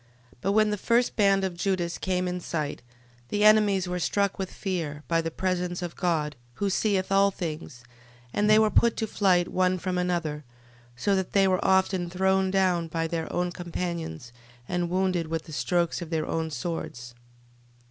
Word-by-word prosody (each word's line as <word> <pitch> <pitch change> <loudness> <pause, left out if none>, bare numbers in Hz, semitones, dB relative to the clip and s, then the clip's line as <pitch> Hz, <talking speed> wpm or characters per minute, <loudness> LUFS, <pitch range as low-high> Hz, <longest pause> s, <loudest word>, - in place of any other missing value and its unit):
12:22. - - -23
But 195 - +1
when 215 0 +4
the 210 - -1
first 235 +4 +1
band 195 -2 +3
of 185 -2 -2
Judas 175 -1 -1
came 185 -1 -1
in 180 0 -2
sight, 155 -6 -3 0.5
the 210 0 0
enemies 210 -3 +5
were 180 0 -2
struck 200 +4 0
with 190 -1 -3
fear, 160 -7 -4
by 165 -1 +2
the 165 - -3
presence 180 0 -2
of 175 - -5
God, 155 -5 0 0.2
who 200 +5 -1
seeth 195 -1 0
all 195 0 +5
things, 155 -9 -6 0.5
and 210 +1 +2
they 215 - +7
were 215 -1 +4
put 235 -1 +3
to 225 - 0
flight 185 -5 +2
one 185 0 +1
from 180 +1 -2
another, 170 -4 -1 0.5
so 195 +11 +1
that 190 -1 -2
they 195 -1 +4
were 185 -1 +1
often 190 -2 +2
thrown 190 +1 +2
down 185 -3 +2
by 165 0 -2
their 165 0 -3
own 180 0 -1
companions, 170 - -5 0.3
and 175 -1 -1
wounded 185 -2 0
with 165 0 -3
the 160 - -11
strokes 175 +3 0
of 170 - -6
their 160 -2 -1
own 160 0 -2
swords. 125 -5 -5
180 Hz, 185 wpm, -27 LUFS, 165-195 Hz, 0.5 s, they